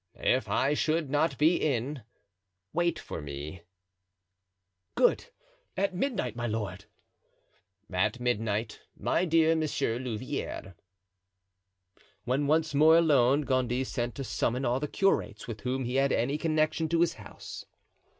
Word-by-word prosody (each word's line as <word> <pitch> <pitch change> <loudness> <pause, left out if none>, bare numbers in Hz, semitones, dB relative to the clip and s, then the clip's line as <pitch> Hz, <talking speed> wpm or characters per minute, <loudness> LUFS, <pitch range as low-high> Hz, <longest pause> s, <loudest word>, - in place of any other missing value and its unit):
"If 130 +1 +1
I 140 +2 +2
should 155 -1 0
not 145 -1 +1
be 160 +4 +4
in, 135 0 -1 0.7
wait 170 0 +1
for - - -6
me." 75 +4 -7 1.3
"Good! 480 -1 +3 0.5
at 195 0 +1
midnight, 185 - -2
my 120 0 -2
lord." 110 -2 -4 1.0
"At 105 +5 0
midnight, 115 -2 -1 0.2
my 180 - +1
dear 165 -1 +4
Monsieur 140 -7 -1
Louvieres." 125 -4 -4 1.5
When 135 +4 0
once 155 0 +2
more 155 +3 +6
alone 145 -4 +4
Gondy 130 -2 0
sent 120 -2 -3
to 135 - -4
summon 125 0 -1
all 120 +2 +1
the 150 - -2
curates 195 +6 0
with 110 -3 -6
whom 130 +1 -2
he 125 +2 -1
had 135 0 +3
any 140 +6 0
connection 155 0 +1
to 170 +1 +2
his 170 -1 +3
house. 105 - -10
135 Hz, 130 wpm, -29 LUFS, 120-160 Hz, 1.5 s, more